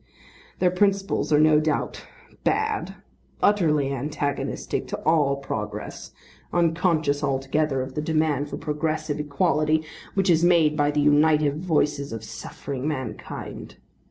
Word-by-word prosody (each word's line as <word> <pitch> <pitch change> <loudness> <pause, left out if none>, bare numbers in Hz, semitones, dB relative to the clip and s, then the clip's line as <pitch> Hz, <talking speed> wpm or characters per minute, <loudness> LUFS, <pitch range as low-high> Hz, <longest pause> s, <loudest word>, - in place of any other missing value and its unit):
Their 180 -1 +2
principles 195 -1 +1
are 150 - +5
no 155 0 +5
doubt 155 -1 -2 0.4
bad, 435 0 0 0.4
utterly 150 -9 +2
antagonistic 145 +1 -3
to - - -4
all 150 -3 +3
progress, 140 0 -6 0.4
unconscious 165 -4 +1
altogether 135 0 0
of 130 0 -8
the 150 - -2
demand 155 -2 0
for - - -5
progressive 150 0 -2
equality 155 +1 +1 0.3
which 195 -2 +3
is 165 0 +3
made 165 -4 +4
by 145 -1 +2
the 150 0 +1
united 150 0 +3
voices 150 -4 0
of 115 -1 -6
suffering 135 +4 -6
mankind. 140 -4 -6
150 Hz, 125 wpm, -24 LUFS, 145-165 Hz, 0.4 s, are